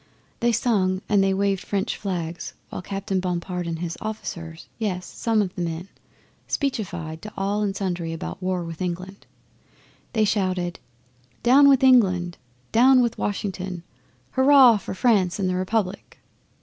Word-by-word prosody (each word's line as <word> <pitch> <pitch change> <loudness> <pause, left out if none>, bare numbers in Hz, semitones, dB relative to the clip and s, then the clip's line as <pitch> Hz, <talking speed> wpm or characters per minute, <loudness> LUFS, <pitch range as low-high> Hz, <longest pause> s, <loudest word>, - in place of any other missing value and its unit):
They 240 0 +2
sung 200 -5 +1
and 205 -2 +3
they 195 - +2
waved 195 0 0
French 200 +2 -1
flags, 175 -4 -4
while - - -6
Captain 195 0 -2
Bompard 180 -1 -3
and 165 -1 -3
his 170 0 -5
officers 170 -7 -6
yes, 185 -5 -2
and - - -17
some 225 -2 +2
of 185 -2 -5
the 180 - -5
men 170 +2 -4 0.6
speechified 175 - -3
to 215 - -8
all 200 +2 0
and 200 -2 -1
sundry 175 -4 -2
about 165 +3 -6
war 185 -1 -1
with 165 0 -7
England. 185 +2 -5 0.9
They 220 -2 +3
shouted, 185 -4 -1 0.6
"Down 275 +4 +7
with 270 -1 +4
England!" 185 -9 +4 0.3
"Down 255 +2 +6
with 235 -1 -2
Washington!" 190 -3 -3 0.5
"Hurrah 260 -3 +7
for 195 - -6
France 190 -5 +2
and 195 -2 0
the 185 - 0
Republic!" 185 +1 -2
190 Hz, 150 wpm, -24 LUFS, 180-215 Hz, 0.9 s, Down